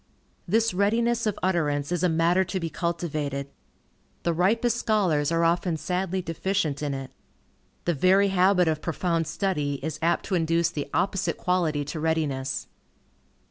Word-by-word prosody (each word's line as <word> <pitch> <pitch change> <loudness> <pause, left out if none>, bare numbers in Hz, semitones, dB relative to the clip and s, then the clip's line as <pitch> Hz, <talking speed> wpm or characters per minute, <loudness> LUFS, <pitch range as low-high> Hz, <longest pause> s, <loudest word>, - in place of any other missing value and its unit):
This 225 +3 +2
readiness 230 +4 +1
of 210 - -1
utterance 150 -5 0
is 175 -2 0
a 180 - +3
matter 165 +3 +3
to 190 +1 -3
be 165 -2 -4
cultivated. 150 -5 -3 0.7
The 170 - +1
ripest 225 +7 +2
scholars 175 -11 +1
are 165 0 +2
often 170 0 +1
sadly 185 +2 -2
deficient 165 -3 -1
in 145 -2 -2
it. 135 -1 -6 0.7
The 175 - +2
very 190 +6 +4
habit 185 -1 +3
of 155 -1 0
profound 165 -1 -1
study 150 -8 -1
is 155 -1 -4
apt 170 +1 +1
to 200 - -4
induce 165 -1 +2
the 145 -4 -4
opposite 195 0 0
quality 165 -5 0
to 155 +3 -5
readiness. 150 -5 -1
170 Hz, 150 wpm, -26 LUFS, 155-190 Hz, 0.7 s, very